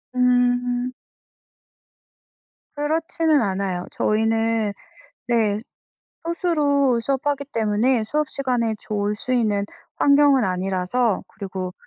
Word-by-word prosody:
음. 245 0 +2
음. - - -6 1.8
그렇지는 315 0 +1
않아요. 190 -3 -2
저희는 225 -1 +1 0.5
네, 215 -3 +2 0.6
소수로 290 -7 +1
수업하기 280 +2 -1
때문에 225 +2 +1
수업 300 +7 -1
시간에 245 -5 -1
졸 210 0 -2
수 255 - -6
있는 210 -4 +1 0.3
환경은 280 -3 +5
아니라서 190 +4 0
그리고 185 -3 -6
240 Hz, 210 characters per minute, -22 LUFS, 210-280 Hz, 1.8 s, 환경은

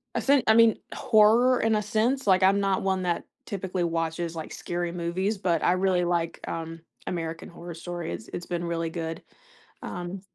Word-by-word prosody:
a - - +1
se 275 -2 +4
I 220 - +7
mean, 230 -1 +6 0.2
horror 235 +2 +4
in 225 -1 +2
a 210 - +1
sense- 225 +5 0
like, 190 -1 +5
I'm 195 +1 +5
not 195 -1 +1
one 190 -1 0
that 175 -1 -1 0.2
typically 190 -2 -3
watches, 165 0 -2
like, 160 - -6
scary 175 0 -3
movies, 180 +4 -1
but 175 -3 0
I - - +4
really 185 -1 +2
like, 170 -1 -1
um, 165 0 -5 0.3
American 165 -2 -4
Horror 170 0 -9
Story. 175 0 -5
It's - - -8
it's 175 - -4
been 175 -1 -3
really 165 -1 -2
good. 165 -1 -5 0.6
Um 180 +2 -6
180 Hz, 185 wpm, -27 LUFS, 170-200 Hz, 0.6 s, I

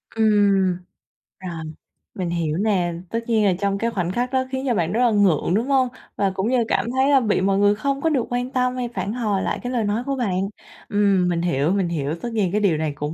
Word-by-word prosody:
Ừm, 200 -4 +3 0.6
rồi, 170 -4 -6 0.5
mình 180 -3 -3
hiểu 165 -2 -1
nè, 185 -5 +1 0.2
tất 230 - -1
nhiên 220 -2 +3
là 190 - +4
trong 200 0 0
cái 230 +2 -1
khoảnh 180 -4 -2
khắc 245 +5 -2
đó 260 0 +2
khiến 265 0 -2
cho 240 - +2
bạn 170 -3 0
rất 235 - 0
là 235 - +3
ngượng, 190 -5 +2
đúng 230 +6 +1
hông? 265 -2 +3 0.3
Và 200 -1 +1
cũng 195 +5 -1
như 255 - +2
là 235 - +3
cảm 205 +5 0
thấy, 265 +2 +2
a, 275 - +6
bị 210 -5 +1
mọi 195 0 +2
người 205 0 +4
không 275 +5 -2
có 325 - +2
được 265 -6 +1
quan 245 +1 -2
tâm 250 -1 0
hay 245 -2 -3
phản 195 +3 -3
hồi 210 -6 -1
lại - - -2
cái 245 - -3
lời 235 -3 0
nói 210 +4 -1
của 275 0 -2
bạn. 195 -8 -1 0.5
Ừm, 200 -3 +2
mình 170 -1 0
hiểu, 155 -1 +1
mình 195 -3 +1
hiểu, 150 -1 -2
tất 240 - -3
nhiên 195 -5 0
cái 210 +1 0
điều 175 -7 +2
này 155 -1 -1
cũng 150 +1 -4
205 Hz, 255 wpm, -22 LUFS, 180-240 Hz, 0.6 s, a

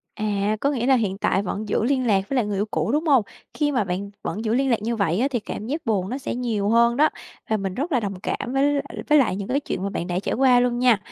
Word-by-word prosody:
À, 210 0 0
có 280 - +2
nghĩa 245 -4 -1
là 270 - +5
hiện 200 -6 0
tại 195 - +1
vẫn 205 +2 -4
giữ 220 - +1
liên 260 -1 +1
lạc 195 -3 +2
với 275 - -1
lại 245 - +2
người 205 -2 -2
yêu 205 - 0
cũ, 225 - -1
đúng 310 +3 0
hông? 270 -6 +5 0.3
Khi 295 -1 0
mà 245 -7 +1
bạn 190 +2 -4
vẫn 220 - -4
giữ 220 0 +1
liên 270 +1 +1
lạc 230 -4 +1
như 230 +1 -1
vậy 195 -2 +1
á, 270 - +2
thì 240 -4 -1
cảm 210 - -6
giác 300 +7 -3
buồn 195 -4 0
nó 260 - -3
sẽ 265 - -4
nhiều 225 -5 -1
hơn 235 +1 +4
đó, 305 +2 +5 0.4
và 220 - +3
mình 195 -2 -3
rất 300 - -3
là 250 - +3
đồng 195 -4 -4
cảm 245 - -3
với 280 +2 +2
l - - +1 0.3
với 300 0 +6
lại 235 -8 +2
những 200 -1 -5
cái 275 +3 +1
chuyện 190 - -4
mà 200 - -2
bạn 175 - -3
đã 180 0 -1
trải - - -2
qua 255 -1 +5
luôn 245 -1 +1
nha. 245 -4 +4
230 Hz, 300 wpm, -23 LUFS, 200-265 Hz, 0.4 s, với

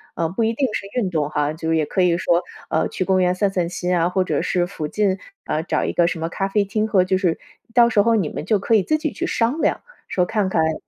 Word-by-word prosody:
啊， 165 - 0
不 190 +8 -2
一 225 - +2
定 270 +3 0
是 - - -3
运 205 - 0
动 150 -4 0
哈， 150 0 -1
就 160 +1 -4
是 165 - +2
也 155 -1 +1
可 185 - -1
以 175 -1 +3
说， 175 0 +1 0.3
呃， - - +1
去 - - -2
公 190 0 +2
园 180 0 +3
散 200 +1 +1
散 180 -3 0
心 180 0 -1
啊， 170 +1 +2
或 185 +1 +1
者 185 - -1
是 175 -1 +1
附 160 -5 -5
近， 195 +1 0 0.3
啊， 155 - -1
找 - - -1
一 - - -2
个 175 -1 +3
什 175 -1 -2
么 165 - -2
咖 195 +3 -2
啡 205 +1 +1
厅 215 +2 -1
和 190 -4 +3
就 185 +1 +1
是 175 -3 +1 0.4
到 240 -1 +7
时 215 -3 +4
候 230 +2 +3
你 190 -9 0
们 - - -5
就 215 +3 +2
可 215 +4 0
以 210 - +5
自 310 - +1
己 310 -1 -2
去 - - -3
商 245 +7 0
量 - - +1 0.3
说 180 - +1
看 205 -1 0
看 165 - +1
诶， 160 0 +1
185 Hz, 310 characters per minute, -21 LUFS, 170-210 Hz, 0.4 s, 到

